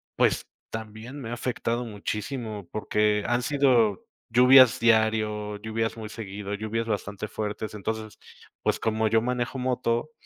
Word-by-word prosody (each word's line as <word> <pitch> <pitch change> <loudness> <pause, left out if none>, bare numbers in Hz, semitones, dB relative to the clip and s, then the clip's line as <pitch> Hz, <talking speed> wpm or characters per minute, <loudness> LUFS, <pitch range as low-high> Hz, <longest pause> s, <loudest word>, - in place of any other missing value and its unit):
pues, - - +2 0.2
también 110 +5 -7
me 115 - -6
ha - - -3
afectado 120 0 -2
muchísimo, 105 -1 -5
porque 105 -1 +1
han 120 0 +1
sido 125 -7 +2 0.2
lluvias 125 +1 +7
diario, 110 -2 +2
lluvias 110 +1 -2
muy 110 -2 -7
seguido, 105 -2 -6
lluvias 110 +2 -3
bastante 105 0 -3
fuertes. 105 0 -4
Entonces, 110 +1 -5 0.4
pues, - - +1
como 110 0 +1
yo 110 +1 +3
manejo 125 +2 -2
moto, 125 +2 0
110 Hz, 135 wpm, -26 LUFS, 105-120 Hz, 0.4 s, lluvias